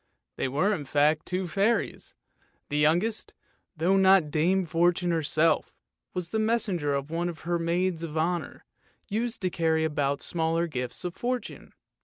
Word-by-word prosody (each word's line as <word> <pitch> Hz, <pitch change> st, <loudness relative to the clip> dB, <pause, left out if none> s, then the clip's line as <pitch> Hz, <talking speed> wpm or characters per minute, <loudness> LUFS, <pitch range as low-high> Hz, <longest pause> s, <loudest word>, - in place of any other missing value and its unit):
They -, -, -1 dB
were 155 Hz, +11 st, +1 dB
in 150 Hz, -8 st, -4 dB
fact 150 Hz, +3 st, +2 dB
two 185 Hz, +1 st, -1 dB
fairies, 200 Hz, +6 st, 0 dB, 0.5 s
the 145 Hz, -, 0 dB
youngest, 175 Hz, +9 st, +1 dB, 0.4 s
though 180 Hz, +5 st, +3 dB
not 190 Hz, -5 st, +5 dB
Dame 180 Hz, +5 st, +2 dB
Fortune 175 Hz, +2 st, +2 dB
herself, 160 Hz, 0 st, +1 dB, 0.4 s
was 175 Hz, -1 st, -4 dB
the 220 Hz, -, 0 dB
messenger 200 Hz, -10 st, +1 dB
of 140 Hz, +2 st, -4 dB
one 170 Hz, +1 st, -1 dB
of 165 Hz, -, -8 dB
her 170 Hz, +1 st, -1 dB
maids 170 Hz, +1 st, 0 dB
of 160 Hz, -2 st, -5 dB
honour, 170 Hz, +2 st, -2 dB, 0.4 s
used 225 Hz, +3 st, -2 dB
to 185 Hz, -, +1 dB
carry 160 Hz, -1 st, +1 dB
about 145 Hz, -2 st, 0 dB
the -, -, -11 dB
smaller 165 Hz, 0 st, 0 dB
gifts 125 Hz, 0 st, -4 dB
of 175 Hz, -, -3 dB
fortune. 245 Hz, +5 st, -4 dB
170 Hz, 160 wpm, -27 LUFS, 155-185 Hz, 0.5 s, not